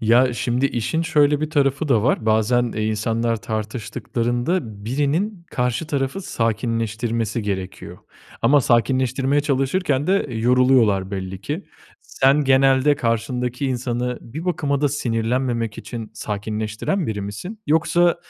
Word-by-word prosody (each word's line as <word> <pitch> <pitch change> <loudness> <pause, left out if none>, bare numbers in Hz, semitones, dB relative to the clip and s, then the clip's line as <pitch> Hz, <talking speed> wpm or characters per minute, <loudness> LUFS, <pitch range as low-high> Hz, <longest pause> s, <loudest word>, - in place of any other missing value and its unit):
Ya, 120 +3 +4
şimdi 125 +3 +1
işin 140 +7 -1
şöyle 150 -3 +3
bir 155 - -2
tarafı 140 0 +1
da 115 -6 +3
var; 115 -4 +1
bazen, 115 +2 +2
eee, 110 0 -1
insanlar 115 +2 0
tartıştıklarında 115 - -3
birinin 155 - -1
karşı 125 +5 -1
tarafı 140 +5 -2
sakinleştirmesi 115 - -1
gerekiyor. 95 -2 -5 0.4
Ama 145 0 +5
sakinleştirmeye 130 +3 +2
çalışırken 140 +1 0
de 195 -2 +2
yoruluyorlar 115 -5 +3
belli 95 -1 -5
ki. 150 - -4 0.4
Sen 140 +3 +2
genelde 135 +1 +4
karşındaki 125 +3 -1
insanı 125 -1 -2
bir 150 +8 -8
bakıma 145 -6 0
da 145 - +3
sinirlenmemek 120 -3 -1
için 115 -2 -7
sakinleştiren 110 - -3
biri 105 -2 -3
misin? 175 - -6
Yoksa, 170 +3 +3
125 Hz, 120 wpm, -21 LUFS, 115-145 Hz, 0.4 s, Ama